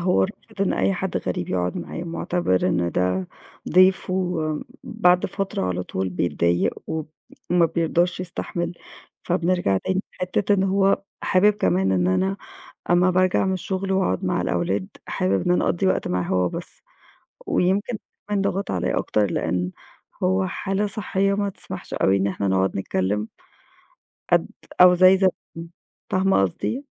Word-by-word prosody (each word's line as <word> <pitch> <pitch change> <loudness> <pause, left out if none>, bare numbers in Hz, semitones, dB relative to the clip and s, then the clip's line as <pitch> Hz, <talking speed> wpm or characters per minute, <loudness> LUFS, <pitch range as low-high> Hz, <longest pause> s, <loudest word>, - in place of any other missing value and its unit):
هو 180 +1 +2
رافض 210 +1 -6
إن 195 - +1
أي 195 - +1
حد 185 0 -3
غريب 90 -1 -3
يقعُد 90 -1 -1
معاه، - - -5
مُعتبِر 165 - 0
إن 85 -1 0
ده 90 0 0 0.4
ضيف، 185 +2 +4
وم 175 -5 -1 0.2
بعد 180 -3 +2
فترة 195 - -3
على 90 0 -1
طول 95 +1 -3
بيتضايق 85 -1 0
وب 160 -1 -4 0.4
وما 175 -1 +4
بيرضاش 170 +2 0
يستحمل، 175 -1 -4 0.5
فبنرجع 175 - +1
تاني 190 - -1 0.2
لحتّة 190 +3 +1
إن 190 - +1
هو 195 0 +2 0.2
حابب 205 +3 +4
كمان 95 - +1
إن 90 -1 +2
أنا 190 - +1 0.5
أمّا 180 +1 +4
بارجع 185 +1 +2
من 190 - +1
الشُغل 190 +1 -2
وأقعُد 95 - 0
مع 95 - 0
الأولاد، 95 +2 -1 0.2
حابب 95 - 0
إن - - +2
أنا 180 - +2
أقضّي 190 +2 +1
وقت 185 - +1
معاه 90 0 0
هو 90 0 +1
بس، - - -4 0.6
ويمكن 200 +5 +1 0.3
كمان 205 -1 0
ضَغَط 195 0 -1
عليّا 90 -1 0
أكتر 105 -1 +1
لإن 90 +1 -1 0.5
هو 95 +1 +2
حالة 195 - -2
صحيّة 195 -1 0
ما 200 0 0
تسمحش - - -5
أوي 95 - +3
إن 100 0 +1
إحنا 100 0 -1
نقعُد 95 0 +1
نتكلِّم. 95 +3 -1 1.0
قد - - +4 0.3
أو 180 0 +8
زي 185 +1 +6
زمان، 175 -3 -2 0.4
فاهمة 190 - +3
قصدي؟ 230 - -2
175 Hz, 150 wpm, -23 LUFS, -, 1.0 s, أو